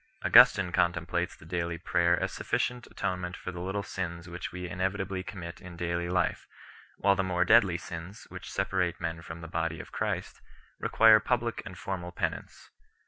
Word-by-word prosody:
Augustin 100 -1 +8
4 - - -10
contemplates 85 +1 0
the - - -16
daily 85 0 -2
prayer 85 0 +2
as - - -1
sufficient 125 0 -1
atonement 90 -1 -3
for 90 - -6
the 90 - -7
little 95 +3 -2
sins 85 -2 -5
which 85 +1 -6
we 90 0 -5
inevitably 95 +1 -2
commit 90 -3 -8
in 90 -1 -10
daily 85 0 -2
life, 90 +1 0 0.5
while 100 -1 +4
the 95 - +1
more 90 -1 +1
deadly 100 -5 +5
sins, 85 +5 -8
which - - -8
separate - - 0
men 80 0 -3
from 85 0 -8
the 85 - -7
Body 85 -1 -2
of - - -9
Christ, - - -3 0.4
require 110 -1 +6
public 120 +1 -1
and 90 - -9
formal 90 -1 -4
penance. - - -4
90 Hz, 175 wpm, -29 LUFS, 85-95 Hz, 0.5 s, Augustin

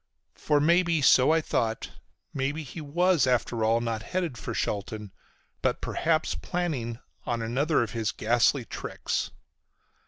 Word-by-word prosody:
For 150 -1 +1
maybe, 170 +2 +3
so 130 +1 +6
I 165 0 +3
thought, 115 -6 -1 0.4
maybe 145 +3 -2
he 155 +4 -8
was 170 0 +2
after 120 -2 +1
all 115 +1 +3
not 115 -2 -2
headed 175 -1 -2
for 110 - -5
Shelton, 105 0 -3 0.5
but - - +1
perhaps 160 -1 0
planning 145 -11 -3 0.3
on 120 -1 -1
another 135 +5 +1
of 115 - -5
his 110 -2 -1
ghastly 120 +3 +2
tricks. - - -3
130 Hz, 135 wpm, -27 LUFS, 115-160 Hz, 0.5 s, so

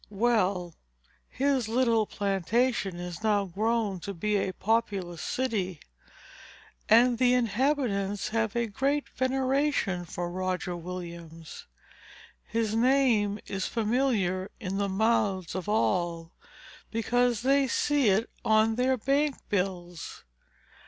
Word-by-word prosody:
Well; 200 -5 +1 0.6
his 270 -4 0
little 230 -3 +2
plantation 200 +1 0
is 175 +1 -6
now 210 -2 +2
grown 210 +1 -1
to 200 +2 -6
be 210 +5 -1
a 195 -1 0
populous 195 -5 -1
city; 200 - -2 1.1
and 235 +2 +5
the 250 -1 +4
inhabitants 225 -4 0
have 225 0 -1
a 235 0 +1
great 275 +7 -1
veneration 260 -7 0
for 175 +1 -5
Roger 185 -1 -2
Williams. 170 -2 -8 0.8
His 225 -1 -1
name 235 -4 +3
is 195 -1 -3
familiar 215 -5 0
in 195 -3 -3
the 200 -1 0
mouths 195 -3 +1
of 185 +2 -4
all 175 -5 0 0.6
because 240 0 +1
they 275 +1 +3
see 285 -1 +2
it 205 +4 +2 0.2
on 220 +1 +3
their 260 +1 +2
bank 275 +4 +1
bills. 180 -4 -3
210 Hz, 110 wpm, -28 LUFS, 185-245 Hz, 1.1 s, and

